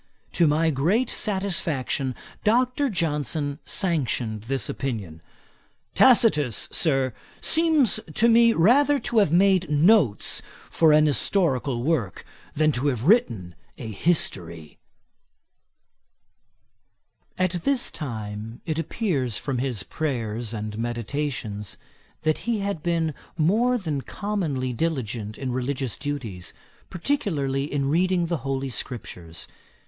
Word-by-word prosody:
To 170 - +3
my 160 +2 +2
great 185 - +1
satisfaction, 165 - -1 0.3
Dr. 255 +5 +2
Johnson 150 - -1
sanctioned 125 - -1
this 135 -1 -2
opinion. 100 - -5 0.7
'Tacitus, 180 - +4
Sir, 135 -6 +1 0.3
seems 315 -9 +3 0.2
to 230 - +4
me 230 0 +6
rather 275 - +4
to 235 - +1
have 200 -8 +3
made 185 -1 +3
notes 150 - +3 0.3
for 160 -2 +4
an 150 0 +5
historical 140 -5 +2
work, 135 - -1 0.3
than 155 +1 +3
to 135 +1 -1
have 125 -5 -1
written 115 - +2 0.2
a 115 -3 -6
history.' 85 - -1 2.6
At 185 -1 0
this 275 -3 +1
time 110 -4 -6
it 160 -1 -2
appears 150 - -1
from 135 -4 -3
his 125 -5 -1
Prayers 120 -7 -3
and 105 -1 -5
Meditations, 120 -3 -3 0.5
that 155 0 +1
he 230 - +1
had 200 -5 -3
been 165 -1 0 0.2
more 220 +10 +2
than 155 - -3
commonly 155 -11 -3
diligent 115 -7 -3
in 130 -2 -4
religious 130 -1 -2
duties, 120 -11 -5 0.4
particularly 155 - -1
in 140 -1 -1
reading 180 +2 +2
the 170 0 -1
Holy 135 0 -3
Scriptures. 90 -10 -5
145 Hz, 110 wpm, -24 LUFS, 120-185 Hz, 2.6 s, me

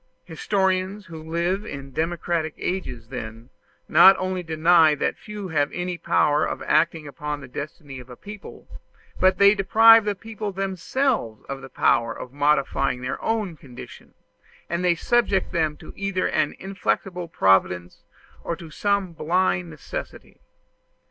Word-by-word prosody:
Historians 190 +3 -1
who 165 -3 -9
live 170 +5 -1
in 140 -8 -8
democratic 165 +1 -2
ages, 125 -11 -4
then, 115 -1 -8 0.4
not 180 +5 +7
only 185 0 -2
deny 160 -1 +4
that - - -1
the - - -28
few 210 -3 -7
have 145 -3 0
any 180 0 -3
power 150 -3 +2
of - - -3
acting 155 +1 +1
upon 150 +1 -5
the 140 - -10
destiny 140 +1 -8
of 125 0 -13
a 125 - -9
people, 205 - -11 0.5
but 185 0 +4
they 200 0 +7
deprive 225 +3 +6
the 205 -1 -1
people 215 0 -6
themselves 195 - -2
of 135 0 -6
the 135 - -10
power 115 -2 +1
of 125 - -9
modifying 140 -3 +1
their 130 - -4
own 215 -6 -1
condition, 130 -5 -13 0.5
and 170 +1 -2
they 175 -1 +3
subject 205 0 +1
them 155 -4 0 0.2
either 195 -2 -1
to - - -5
an 155 -1 +1
inflexible 190 -2 -3
Providence, 95 - +1 0.4
or 170 - -2
to 165 -2 -12
some 200 -1 0
blind 160 - 0
necessity. 80 - -8
170 Hz, 150 wpm, -24 LUFS, 145-190 Hz, 0.5 s, not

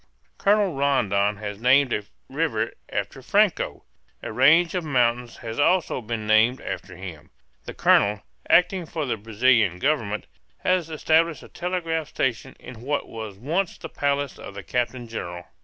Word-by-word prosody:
Colonel 200 -2 +3
Rondon 105 -8 +1
has 105 0 -6
named 130 +1 +4
a 105 - -1 0.2
river - - -1 0.2
after - - -4
Franco; - - +1 0.4
a - - -5
range 165 +4 +5
of 180 -2 -1
mountains 120 -4 0
has 115 0 -6
also 175 -2 +2
been 110 -1 -4
named 110 +4 +4
after 95 -1 -6
him; 90 -4 -7
and 75 - -24 0.4
the - - -7
colonel, 105 0 +3 0.3
acting 180 0 +3
for 155 -2 -3
the 125 - -1
Brazilian 110 -2 +2
Government, 110 -4 -1 0.4
has 185 -3 +1
established 160 +1 +1
a - - -13
telegraph 165 -3 -2
station 130 0 -2
in 125 -3 -11
what 140 +3 -2
was 110 -3 -7
once 165 - -1
the 165 - -8
palace 140 -1 -1
of 100 - -9
the 100 - -7
captain 125 +1 -2
general. 90 -6 -6
125 Hz, 155 wpm, -24 LUFS, 110-160 Hz, 0.4 s, range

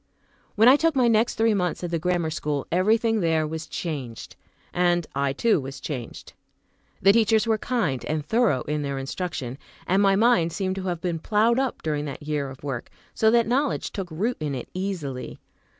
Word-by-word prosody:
When 220 +3 +5
I 265 +3 +8
took 325 0 +1
my 250 -2 +4
next 230 +1 +2
three 225 0 +3
months 180 -3 -1
at 175 - -3
the 165 - 0
grammar 175 -1 0
school, 150 -2 -2
everything 220 +5 +2
there 160 -3 +1
was 160 +1 -5
changed, 135 -9 -5 0.4
and 175 -1 +2
I 140 0 0
too 215 +8 +2
was 135 +1 -7
changed. 130 -6 -7 0.7
The 195 - +8
teachers 220 0 +3
were 220 -1 +1
kind, 195 - -1
and 155 -1 -2
thorough 220 - +2
in 150 0 -2
their 140 -1 -3
instruction; 135 -2 -4 0.3
and 190 +2 +2
my 195 -1 +4
mind 195 -7 +3
seemed 190 -2 -1
to 190 - -4
have 175 -2 -2
been 170 -3 -2
ploughed 225 +7 +2
up 265 -2 -2
during 150 -2 -1
that 140 0 -7
year 145 -2 -2
of 135 +1 -12
work, 135 -5 -4 0.2
so 220 - +3
that 235 0 +4
knowledge 265 +4 0
took 190 -3 -5
root 205 +10 -1
in 150 -3 -2
it 125 - -6
easily. 180 -9 -4
175 Hz, 195 wpm, -25 LUFS, 150-220 Hz, 0.7 s, I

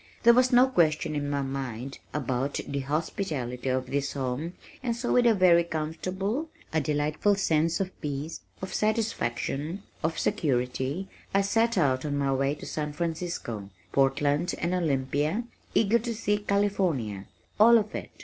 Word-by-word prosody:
There 235 0 +8
was 255 +1 +4
no 250 +1 +7
question 155 -10 +2
in 145 -1 -1
my 140 -1 0
mind 135 -1 -5
about 135 -1 -1
the 140 0 -2
hospitality 140 - -2
of 130 0 0
this 140 0 -1
home 140 +5 -3 0.3
and 240 -3 -1
so 240 +1 -1
with 245 -1 +5
a 225 - +5
very 175 -3 +6
comfortable, 185 - -3 0.2
a 160 - +2
delightful 150 +7 +1
sense 165 -4 +1
of 190 -1 -1
peace, 150 +2 -4 0.2
of 190 - -4
satisfaction, 190 - -1 0.2
of 160 +1 0
security, 130 +5 0 0.3
I 195 - +5
set 225 +3 +2
out 130 -6 +2
on 145 -2 -1
my 140 -1 +1
way 135 +2 +1
to - - -10
San 150 -1 -3
Francisco, 160 - -3 0.2
Portland 145 +4 +2
and 170 +1 -1
Olympia, 150 - 0 0.3
eager 225 +2 +4
to 235 0 -3
see 210 -1 0
California 185 - 0 0.3
all 230 +2 +8
of 215 -1 -1
it. - - -5
155 Hz, 155 wpm, -28 LUFS, 135-200 Hz, 0.3 s, There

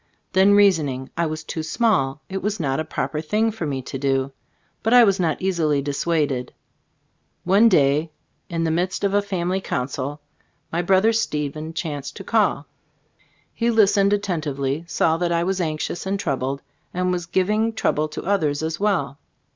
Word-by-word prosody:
Then 195 +2 +5
reasoning. 155 -10 +2
I 170 -1 0
was 155 +1 -5
"too 160 - -4
small"; 155 - 0
it 195 0 -4
was 210 +1 -2
not 135 -3 -1
a - - 0
proper 155 0 -3
thing 215 +8 +1
for 190 -7 -4
me 135 -2 -3
to 135 - -6
do. 135 0 0 0.5
But 225 +3 +3
I 245 - +9
was 195 -4 +3
not 165 -4 0
easily 165 -6 +1
dissuaded. 145 -2 -1 0.9
One 200 +6 +5
day 145 -1 +3 0.4
in 165 -1 -1
the 165 - +1
midst 180 +4 -1
of 200 -1 +1
a 205 - +4
family 185 -1 -2
council, 135 0 -3 0.5
my 170 - 0
brother 190 +5 +3
Stephen 155 -7 -2
chanced 145 -4 -4
to - - -8
call. - - +1 0.9
He 235 0 0
listened 205 -3 +4
attentively, 155 -7 -1
saw 160 -1 +1
that 175 0 -1
I 170 0 +1
was 190 +1 -1
anxious 160 +2 -3
and 195 +1 -1
troubled, 140 -6 -2 0.3
and 180 0 0
was 175 -2 -2
giving 210 +6 +1
trouble 155 -8 0
to 155 - -7
others 160 -7 0
as 160 0 -3
well. 180 -9 0
165 Hz, 170 wpm, -22 LUFS, 145-195 Hz, 0.9 s, I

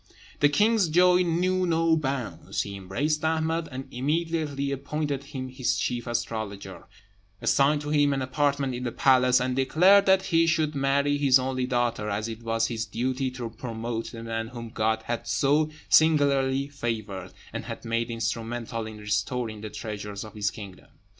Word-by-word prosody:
The 145 - +5
king's 210 +4 +3
joy 180 +2 +5
knew 180 +2 +1
no 165 -1 +3
bounds; 135 -6 -3
he 100 - -7
embraced 140 +12 -2
Ahmed, 160 +1 0
and 130 +1 -6
immediately 150 0 -1
appointed 140 0 -3
him 135 -3 -6
his 130 -1 -1
chief 120 -1 -2
astrologer, 110 -4 -4 0.5
assigned 145 +2 +3
to 150 0 -4
him 145 -1 +3
an 135 -1 -1
apartment 140 0 0
in 125 +1 -4
the 120 - -2
palace, 125 -1 +4
and 125 0 -1
declared 185 +9 +5
that 190 0 +5
he 165 -1 +3
should 155 -2 +1
marry 140 +1 +1
his 135 -2 +6
only 130 -1 -2
daughter, 120 -4 0
as 105 +2 -2
it 115 0 -7
was 115 0 0
his 115 -1 -2
duty 130 +2 -1
to 125 -3 -6
promote 115 0 -5
the 115 -1 -8
man 115 0 -3
whom 115 -1 -8
God 110 -1 0
had 120 0 -4
so 150 +2 +2 0.2
singularly 140 -3 +3
favoured, 110 -9 -4 0.2
and - - -5
had - - -7
made 115 +1 -1
instrumental 115 0 -3
in 110 -1 -9
restoring 105 +2 -2
the 110 - -6
treasures 105 -2 -6
of 110 - -10
his 105 -1 0
kingdom. 100 -5 -10
130 Hz, 165 wpm, -26 LUFS, 115-150 Hz, 0.5 s, his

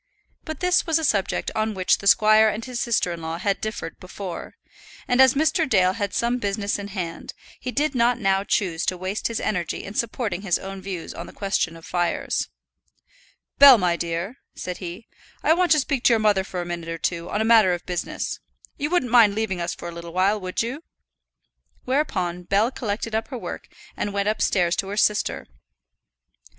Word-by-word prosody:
But 315 +2 -6
this 360 0 +2
was 325 -1 +3
a 320 - -2
subject 200 -10 0
on 215 -1 -1
which 185 -1 +2
the 200 - -4
squire 215 +2 +6
and 215 +2 -4
his 250 -2 -5
sister 225 -6 +1
in 170 -1 -6
law 160 +1 -4
had 195 +2 -1
differed 215 0 -5
before, - - -7 0.5
and 245 +1 +4
as 265 0 +6
Mr. 315 +1 +2
Dale 185 -4 +4
had 205 -1 -3
some 240 +1 0
business 200 -1 -1
in 200 - -5
hand, 180 -5 -6 0.2
he 255 - -4
did 295 +3 0
not 240 -1 +3
now 195 -3 +1
choose 175 -5 0
to 185 - 0
waste 185 +3 -2
his 230 -1 -3
energy 180 -5 -2
in 200 - -8
supporting 220 -4 -2
his 195 -4 +1
own 195 0 -7
views 185 -3 -6
on - - -7
the - - -10
question 195 -4 -1
of 165 - -14
fires. 175 -1 -1 1.1
"Bell, 280 -3 +10
my 180 -4 +1
dear," 170 +8 -3 0.2
said 180 -1 -5
he, 180 +4 -7 0.4
"I 315 - +5
want 355 +1 +1
to 305 - +3
speak 275 -2 -1
to 240 - +6
your 225 - +3
mother 210 -3 +3
for 185 -2 -5
a - - -5
minute 170 -1 -5
or 165 - -3
two 170 +1 -3
on 210 - -1
a 220 - +1
matter 220 -5 +6
of 175 -1 -3
business. 175 -1 -3 0.4
You 290 +1 -1
wouldn't 310 -9 +1
mind 225 -4 +6
leaving 210 -5 -2
us 170 +1 -2
for - - -8
a - - -5
little 170 0 -9
while, 195 +3 +2
would 185 +4 -2
you?" 265 +7 -5 1.0
Whereupon 220 - -1
Bell 205 +6 +2
collected 220 -2 -4
up 220 +1 -1
her 260 - -6
work - - -7 0.3
and 205 - -2
went 200 0 0
upstairs 185 -5 +1
to 195 - -1
her 205 +1 -5
sister. 210 -1 +1
205 Hz, 205 wpm, -24 LUFS, 180-235 Hz, 1.1 s, Bell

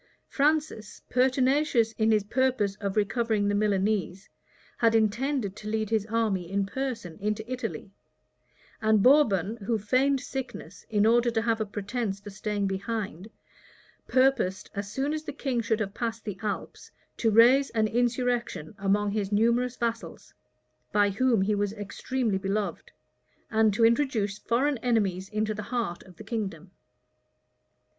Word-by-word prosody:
[*] - - -46
Francis, 295 -7 -1
pertinacious 255 -1 +2
in 220 0 0
his 215 -2 +3
purpose 245 -2 +1
of 200 -1 -3
recovering 215 0 +1
the 205 - +1
Milanese, 205 -2 0 0.5
had 230 -1 +4
intended 225 0 0
to 210 - -9
lead 215 0 -2
his 215 -2 +1
army 210 -6 -1
in 200 0 +1
person 225 -7 -5
into 210 +2 -2
Italy; 245 -5 -5 0.9
and 215 -2 +3
Bourbon, 225 - +4
who 225 +1 -1
feigned 265 +6 +2
sickness 255 -9 -7
in 210 -1 +2
order 240 +2 +4
to 225 -1 0
have 225 -1 0
a 215 - -1
pretence 205 0 -3
for 205 +1 -10
staying 205 0 -2
behind, 195 -1 -4 0.8
purposed, 255 -8 +1
as 200 0 -5
soon 270 +6 -1
as 310 0 -3
the - - -4
king 265 -4 -1
should 220 0 0
have 200 -2 -3
passed 230 0 -4
the 200 -3 -5
Alps, 210 -2 -5 0.3
to 225 - +2
raise 245 +6 +6
an 220 -1 +1
insurrection 240 - -1
among 200 +1 +1
his 205 -1 -2
numerous 235 +4 +2
vassals, 230 -7 -4 0.6
by 205 -1 +3
whom 230 -1 +2
he 210 +2 +1
was 205 0 -1
extremely 215 +1 -2
beloved, 200 +1 -3 0.6
and 220 -1 +4
to 230 - +4
introduce 225 -5 +1
foreign 265 +3 0
enemies 200 -6 0
into 215 0 -1
the 210 - -5
heart 230 -8 -2
of 185 - -16
the - - -11
kingdom. 195 -7 -5
220 Hz, 150 wpm, -27 LUFS, 205-245 Hz, 0.9 s, raise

